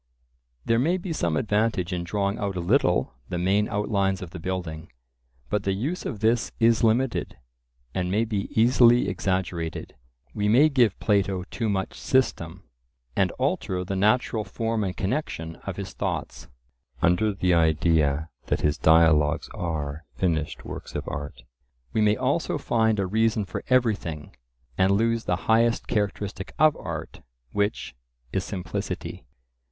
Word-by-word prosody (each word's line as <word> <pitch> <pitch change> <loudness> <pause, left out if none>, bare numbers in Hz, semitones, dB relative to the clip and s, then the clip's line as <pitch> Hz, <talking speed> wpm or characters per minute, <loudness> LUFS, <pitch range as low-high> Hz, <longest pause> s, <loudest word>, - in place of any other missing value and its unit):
There 115 0 +3
may 170 +8 +2
be 180 -2 -4
some 85 - 0
advantage 105 -3 0
in 90 -1 -2
drawing 100 +3 -1
out 100 -2 -2
a - - -2
little 90 - +2 0.2
the 90 - -2
main 95 +4 +2
outlines 100 -2 0
of 85 - -9
the 90 - -7
building; 85 -2 -5 0.6
but 105 - 0
the 100 -1 0
use 145 - -3
of 110 -8 -6
this 115 +1 +2
is 115 0 +4
limited, 115 +3 +1 0.6
and 90 -1 -1
may 105 +5 +1
be 105 -3 -2
easily 120 +1 +5
exaggerated. 90 -3 -2 0.4
We 105 0 -1
may 130 +9 +6
give 120 -8 +2
Plato 100 -3 +1
too 115 -3 -1
much 95 -2 -1
system, 95 -9 0 0.5
and - - +3
alter 90 -1 -1
the 95 +1 -3
natural 110 +2 +2
form 115 0 -2
and 95 -1 -3
connection 95 - -3
of - - -3
his - - -6
thoughts. - - -4 0.6
Under 90 +5 +3
the 90 -2 +1
idea 80 -2 +2 0.2
that - - 0
his 75 +1 +1
dialogues 80 -2 +4
are 80 -2 -4
finished 80 -1 -1
works - - -8
of - - -4
art, 70 -4 -6 0.5
we 110 - +2
may 105 0 +3 0.4
find 110 -2 +1
a 100 - +1
reason 110 +2 +1
for 95 - -6
everything, 105 - 0 0.4
and 95 +1 +4
lose 115 +2 +1
the - - +1
highest 115 +1 +3
characteristic 100 -2 -2
of 155 0 +5
art, - - -6 0.3
which 100 0 -1 0.4
is 95 - 0
simplicity. 95 -3 -5
100 Hz, 145 wpm, -25 LUFS, 85-115 Hz, 0.6 s, may